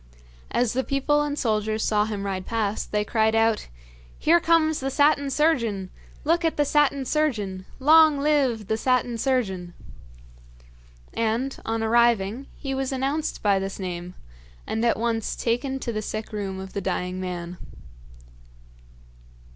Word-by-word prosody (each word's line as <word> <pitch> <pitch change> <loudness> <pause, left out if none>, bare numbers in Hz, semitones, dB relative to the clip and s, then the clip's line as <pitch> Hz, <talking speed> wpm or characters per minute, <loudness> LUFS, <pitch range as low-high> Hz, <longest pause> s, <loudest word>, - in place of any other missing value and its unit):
As 245 -2 +1
the 260 +2 0
people 275 +2 +1
and 295 0 -2
soldiers 215 -3 0
saw 210 -1 +2
him 205 -2 -4
ride 190 -2 -3
past 220 -2 -2
they 210 0 0
cried 220 0 +2
out: 225 -1 +2 0.5
'Here 340 +2 +4
comes 320 -2 +2
the 270 - -2
Satin 285 0 +3
Surgeon! 235 - +1 0.3
Look 335 +3 +2
at 325 - 0
the 295 - +3
Satin 280 -2 +2
Surgeon! 210 -11 -1
Long 310 +1 +6
live 275 -7 +1
the 220 +3 -1
Satin 245 -1 0
Surgeon!' 190 -9 -1 1.4
And, 230 +4 -1
on 225 0 -1
arriving, 235 +1 +2
he 270 -1 -4
was 270 0 -2
announced 275 +4 -2
by 200 -2 +3
this 195 0 -4
name, 180 -1 -5 0.5
and 225 - -2
at 235 - +2
once 225 -1 -1
taken 250 +3 -1
to 235 - -3
the 215 - -2
sick 215 +1 -5
room 195 -2 -4
of 190 0 -8
the 200 - -3
dying 180 0 -2
man. 180 -1 -5
230 Hz, 145 wpm, -25 LUFS, 205-275 Hz, 1.4 s, Long